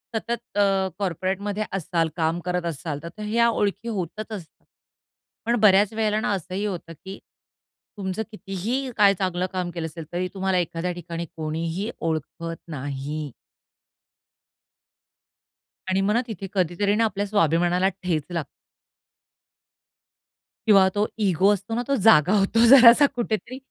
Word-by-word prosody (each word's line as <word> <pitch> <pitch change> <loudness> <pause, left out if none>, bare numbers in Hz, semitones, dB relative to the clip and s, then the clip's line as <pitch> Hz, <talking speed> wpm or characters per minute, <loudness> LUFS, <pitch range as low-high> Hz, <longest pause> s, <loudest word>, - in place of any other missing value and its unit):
सतत 235 0 -4
अ, 195 -2 +3
कॉर्पोरेटमध्ये 195 +3 -2
असाल, 170 -3 -1
काम 165 0 0
करत 180 -1 -1
असाल 155 -2 -4
तर 170 +6 -9
ह्या 235 +3 +2
ओळखी 210 0 -1
होतच 210 +1 -4
असतात 185 -7 -9 0.8
पण 235 +1 +2
बऱ्याच 205 0 +5
वेळेला 215 -1 0
ना 215 - -1
असंही 190 +2 -3
होतं, 175 -4 -5
की 190 +1 -7 0.8
तुमचं 190 +1 -3
कितीही 215 +7 -3
काय 200 -2 +6
चांगलं 185 -1 -1
काम 180 -1 -2
केलं 170 -2 -4
असेल 160 0 -9
तरी 180 +1 -1
तुम्हाला 190 -1 0
एखाद्या 175 0 -2
ठिकाणी 170 -1 -6
कोणीही 165 +6 -3
ओळखत 165 +1 -3
नाही. 145 0 -5 2.6
आणि 190 +1 +1
मग 200 +2 +1
ना 235 - +2
तिथे 195 -4 -6
कधीतरी 190 +2 +1
ना 225 - +2
आपल्या 205 -1 -2
स्वाभिमानाला 175 -1 +2 0.2
ठेच 165 -5 0
लाग 170 -3 -1 2.2
किंवा 195 -3 +6
तो 205 +1 +1 0.2
इगो 190 +1 +3
असतो 205 +3 -4
ना 240 - -1
तो 275 - +2
जागा 185 -4 +6
होतो 225 +4 +3
जरासा 255 +1 +9
कुठेतरी. 235 +1 -3
190 Hz, 135 wpm, -24 LUFS, 170-210 Hz, 2.6 s, जरासा